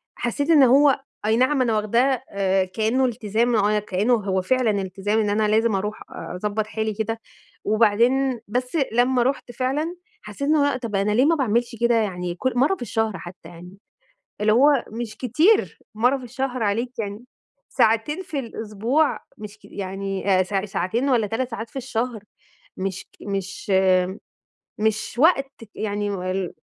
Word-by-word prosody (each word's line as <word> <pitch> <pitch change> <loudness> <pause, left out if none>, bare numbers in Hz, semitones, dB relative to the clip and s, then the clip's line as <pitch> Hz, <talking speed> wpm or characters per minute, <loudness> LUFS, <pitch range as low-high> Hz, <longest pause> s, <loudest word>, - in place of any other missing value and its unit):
حسّيت 285 +6 -2
إن 305 -4 +7
هو 270 +2 +5 0.2
أي 220 +1 +3
نعم 260 +2 +3
أنا 230 -3 +2
واخداه 240 +5 +1
آآ 190 -1 +1
كأنُّه 225 +7 0
التزام 235 0 0
آه 210 -1 +3
أنا 210 0 +2
كأنُّه 210 +3 0
هو 195 -4 -1
فعلًا 250 +3 +2
التزام 195 +3 -1
إن 210 -2 +1
أنا 210 +1 +2
لازم 220 0 +2
أروح 210 +2 -3
آآ 180 - -7
أضبّط 210 +1 -1
حالي 220 0 -2
كده، 225 +2 -3 0.4
وبعدين 235 +5 +2
بس 250 +7 -2 0.2
لمّا 245 +1 +3
رُحت 265 -1 -2
فعلًا 275 +7 -2 0.3
حسّيت 210 +5 -11
إن 310 - +4
هو، 285 -3 +2
طَب 230 -5 -5
أنا 200 +2 +1
ليه 245 +6 +4
ما 330 +2 +4
باعملش 240 -3 0
كده 235 0 +4
يعني 180 -5 -1
كُل 260 +8 -1
مرّة 280 +10 +3
في - - -19
الشهر 225 -3 -1
حتّى 175 -2 -11
يعني؟ 175 +2 -12 0.6
اللي 215 +1 +3
هو 275 +2 +4
مش 230 0 -6
كتير 310 - +2 0.2
مرّة 245 +5 +3
في 260 - -11
الشهر 255 0 -3
عليك 235 +5 -1
يعني 210 +2 -5 0.4
ساعتين 225 +10 +1
في 320 -6 -4
الأسبوع 230 +5 -1 0.2
مش 210 0 -9
كي - - -16
يعني 195 0 -3
آآ - - +4
ساع 195 +1 -2
ساعتين 210 +7 -1
والّا 235 -5 +2
3 245 +4 -2
ساعات 230 0 -5
في - - -28
الشهر 240 -3 -3 0.5
مش 190 0 -4
ك - - -25
مش 195 0 -4
آمم 190 0 +4 0.9
مش 220 +1 -1
وقت 285 -2 +4 0.2
ك 220 - -15
يعني 205 -1 -2
وال 185 -1 -3
225 Hz, 175 wpm, -23 LUFS, 205-255 Hz, 0.9 s, إن